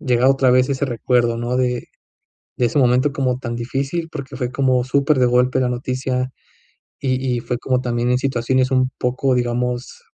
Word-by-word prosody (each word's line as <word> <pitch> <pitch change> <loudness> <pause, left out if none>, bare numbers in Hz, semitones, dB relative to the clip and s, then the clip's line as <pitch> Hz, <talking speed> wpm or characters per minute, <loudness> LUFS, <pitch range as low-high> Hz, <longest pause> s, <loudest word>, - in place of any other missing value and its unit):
llegado 125 -2 +3
otra 135 -1 +2
vez 130 +1 +3
ese 140 +1 0
recuerdo, 120 -1 +1
¿no? 120 +2 -2
De 125 -1 -1 0.7
de 125 - +2
ese 120 +5 0
momento 130 +2 +3
como 130 -2 -1
tan 120 -2 -5
difícil, 135 +7 -3
porque 140 -4 -7
fue 125 -3 -2
como 130 -3 +2
super 140 +1 +2
de 125 - +4
golpe 125 +2 +2
la 125 - +1
noticia, 130 +1 -2 0.7
y 130 -2 +1 0.2
y - - -2
fue 125 +1 -3
como 130 -1 0
también 120 0 -1
en 125 - +3
situaciones 130 0 0
un 130 0 +2
poco, 130 +1 0
digamos, 125 0 -2
125 Hz, 185 wpm, -20 LUFS, 125-130 Hz, 0.7 s, de